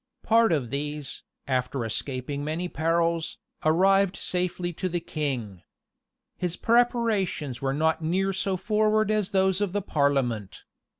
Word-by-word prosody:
Part 225 -2 +4
of 135 -8 0
these, 145 0 -3 0.3
after 125 -1 -1
escaping 130 +5 -3
many 160 +4 -2
perils, 165 +1 0 0.3
arrived 195 +4 +3
safely 180 -1 -1
to 185 +3 -3
the 175 0 -1
king. 130 - -4 0.8
His 180 -2 -2
preparations 225 - +1
were 135 -1 0
not 160 +2 +1
near 190 +5 0
so 190 0 -1
forward 215 +2 +2
as 210 -3 +1
those 190 -1 +2
of 200 -3 0
the 205 - 0
parliament. 135 - 0
170 Hz, 130 wpm, -26 LUFS, 140-195 Hz, 0.8 s, Part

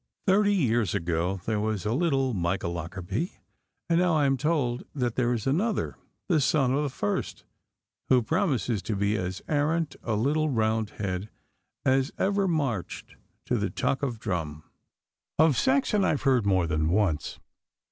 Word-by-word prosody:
Thirty 205 +1 +4
years 120 - +1
ago 85 +3 -1
there 110 -2 0
was 105 -2 -2
a 105 - +1
little 135 -4 +1
Micah 90 -1 -1
Lockarby, 90 - -4 0.5
and 170 0 +3
now 180 -2 +3
I 150 -2 +3
am 135 0 +3
told 135 -3 0
that 125 -4 0
there 120 -1 +1
is 115 -4 -2
another, 195 +11 0 0.3
the 160 -5 +3
son 135 -2 +2
of 140 - +1
the 145 - -1
first, 105 -5 -3 0.7
who 125 -2 +5
promises 135 - 0
to 105 +4 -3
be 100 +2 +1
as 95 -1 -3
arrant 150 0 0
a 110 - -1
little 150 +8 +1
Roundhead 110 -4 -1 0.6
as 135 +1 +2
ever 200 0 +1
marched 135 - -2 0.3
to - - 0
the - - -1
tuck 135 - -1
of 125 -6 -2
drum. 80 -8 -3 0.7
Of 155 -2 +5
Saxon 260 - +2
I - - +3
have 145 - -1
heard 130 -6 +3
more 95 -3 +3
than 75 -1 0
once. 90 -4 0
125 Hz, 160 wpm, -27 LUFS, 100-155 Hz, 0.7 s, who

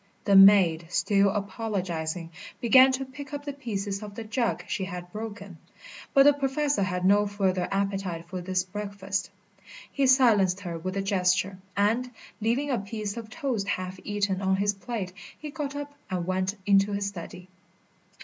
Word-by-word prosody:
The 200 - +4
maid, 190 -4 +7
still 200 +2 +3
apologising, 190 -5 -3 0.3
began 260 +3 +7
to 270 +1 -2
pick 280 +3 -10
up 285 0 -7
the 285 - -4
pieces 205 -7 -4
of 205 -1 -8
the 230 - -5
jug 230 +2 -1
she 190 - -2
had 180 -1 -7
broken; 205 -5 -7 0.5
but 275 - +6
the 290 +1 +7
Professor 280 -1 0
had 180 -1 -1
no 205 +2 +4
further 190 -3 0
appetite 195 -4 -2
for 185 0 -5
his 185 0 0
breakfast. 200 0 -4 0.6
He 275 -1 +1
silenced 210 -8 +4
her 170 -3 -5
with 185 +3 -4
a 195 - -1
gesture, 185 0 +1 0.2
and, 225 +5 +2 0.3
leaving 250 +6 0
a 245 - +1
piece 205 0 -5
of 230 -2 -7
toast 225 -5 -2
half 185 -1 -3
eaten 205 -2 -1
on 190 0 +2
his 200 +1 +1
plate, 195 -3 -5 0.2
he 300 -1 -7
got 285 -1 -4
up 290 0 -6 0.2
and 180 -2 -2
went 185 +2 -1
into 200 0 +4
his 200 0 -1
study. 180 -1 -7
200 Hz, 170 wpm, -27 LUFS, 185-230 Hz, 0.6 s, maid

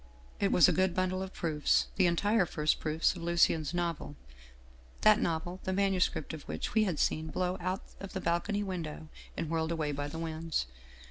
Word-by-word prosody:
" - - -25
It 200 - +2
was 170 - +7
a - - +4
good 185 -1 +1
bundle 185 0 0
of 190 0 -5
proofs, 155 -5 +1
the 185 -2 +4
entire 200 +3 +2
first 150 -1 +1
proofs 160 +3 +1
of 175 - -8
Lucien's 170 -3 +2
novel, 170 -4 -3 0.9
that 215 +2 +6
novel 175 +1 -2
the 190 - -1
manuscript 190 -5 +1
of 155 - -6
which 75 +1 -4
we 220 -1 +4
had 180 -6 -1
seen 155 +2 0
blown 180 +3 -2
out 185 +2 -2 0.2
of 195 - -8
the 190 - -2
balcony 190 +5 0
window 160 -5 -5 0.3
and 165 - -2
whirled 160 0 -1
away 155 -3 -1
by 145 0 -3
the 155 +3 -7
winds. 160 - -2
170 Hz, 195 wpm, -31 LUFS, 160-185 Hz, 0.9 s, was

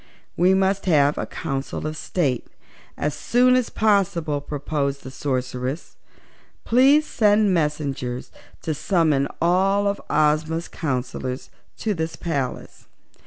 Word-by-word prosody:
"We 185 +3 +4
must 195 0 +1
have 145 -4 +3
a - - -3
Council 135 +2 -4
of 155 0 -3
State 145 -6 -1 0.5
as 150 - -1
soon 250 +1 +3
as 255 -2 +1
possible," 175 -8 +1
proposed 140 -1 -3
the 130 - -8
Sorceress. 130 +2 -3 0.7
"Please 275 +6 +5
send 210 -4 +3
messengers 145 -6 -2 0.3
to 160 - -1
summon 155 -3 +1
all 190 +4 +2
of 200 0 -1
Ozma's 155 +2 +1
counsellors 130 -2 -4 0.3
to 215 - -1
this 160 -2 -3
palace. 140 -7 -4
155 Hz, 120 wpm, -23 LUFS, 140-195 Hz, 0.7 s, Please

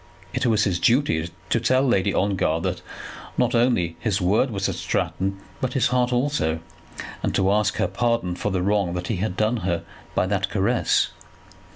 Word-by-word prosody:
It - - 0
was 110 -2 +3
his 90 -4 0
duty 85 - +2 0.2
to 115 - +3
tell 130 +3 +3
Lady 100 -7 +2
Ongar 95 -5 +1
that - - -2 0.6
not - - +2
only 115 -9 +2
his 110 -3 0
word 105 +8 +2
was 100 -3 -1
at - - -1
Stratton, 95 +1 -2 0.2
but 125 -1 -1
his 130 - +2
heart 125 0 +1
also, 125 - 0 0.6
and - - -1
to 95 0 +3
ask 105 0 +2
her - - +1
pardon 115 -7 0
for 105 - -2
the 95 -1 0
wrong 100 -3 +1
that 90 0 -4
he 110 - 0
had 95 0 -2
done 110 +3 +2
her 85 -4 -1 0.3
by - - +2
that - - 0
caress. - - +1
105 Hz, 185 wpm, -24 LUFS, 90-120 Hz, 0.6 s, was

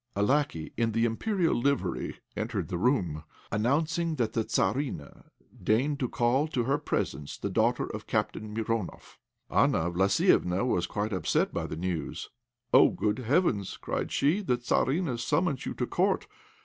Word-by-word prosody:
A 100 - +1
lackey 130 - 0
in 115 -1 +1
the 115 +1 +2
Imperial 170 - +1
livery 140 +3 -1
entered 110 -7 -3
the 85 - -2
room, 90 - +1 0.3
announcing 160 +9 +1
that 115 -5 -1
the 115 - +1
Tzarina 105 - -2 0.4
deigned 135 +7 +2
to 125 - -1
call 125 +5 +2
to 130 -6 -1
her 135 +4 +1
presence 75 - -3
the - - -4
daughter - - +2
of - - -7
Captain 110 -1 -2
Mironoff. 110 -2 -4 0.3
Anna 85 +2 +2
Vlassiéfna 95 +2 +3
was 90 -8 +1
quite 105 +2 -2
upset 95 - +1
by - - -2
this 80 - -6
news. 85 -4 -4 0.4
"Oh, - - +8
good 105 +3 -1
heavens!" 125 - +1
cried - - -3
she; 155 +9 +2
"the 125 -11 +1
Tzarina 130 +2 0
summons 150 +3 0
you - - -4
to - - -1
Court! - - +1
115 Hz, 155 wpm, -29 LUFS, 100-140 Hz, 0.4 s, Oh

